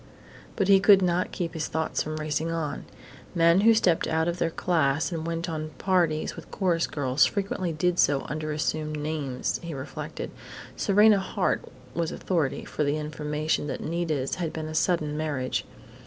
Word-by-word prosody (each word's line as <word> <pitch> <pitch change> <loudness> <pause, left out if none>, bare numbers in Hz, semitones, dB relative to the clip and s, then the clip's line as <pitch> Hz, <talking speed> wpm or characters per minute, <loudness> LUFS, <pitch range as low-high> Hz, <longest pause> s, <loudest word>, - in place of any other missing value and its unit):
But 195 -4 +1
he 195 -1 +7
could 195 -1 +6
not 180 0 +1
keep 170 -2 -3
his 160 -2 -2
thoughts 160 0 -1
from 155 0 -3
racing 155 +1 -2
on.... 160 -3 -3 0.5
Men 170 +2 +5
who 225 +2 +7
stepped 180 -7 +2
out 160 +1 +1
of 175 +1 -2
their 165 - +1
class 160 -2 +1
and 165 -1 -3
went 165 +1 -2
on 155 -2 -3
parties 170 -5 +1
with - - -11
chorus 175 -4 +1
girls 135 -2 +2
frequently 195 -3 -2
did 175 +3 0
so 140 -1 +4
under 155 +1 -4
assumed 155 0 -2
names, 145 -4 -2
he 170 -3 -6
reflected. 135 +2 -6 0.4
Serena 210 0 +5
Hart 190 0 -1 0.3
was 165 +1 -1
authority 165 -7 -1
for - - -2
the 145 +1 +1
information 150 0 -2
that - - -3
Nita's 155 -5 -1
had 165 -2 -1
been 160 -1 -5
a 155 - -6
sudden 155 -3 +1
marriage. 145 -5 -2
160 Hz, 170 wpm, -27 LUFS, 150-175 Hz, 0.5 s, he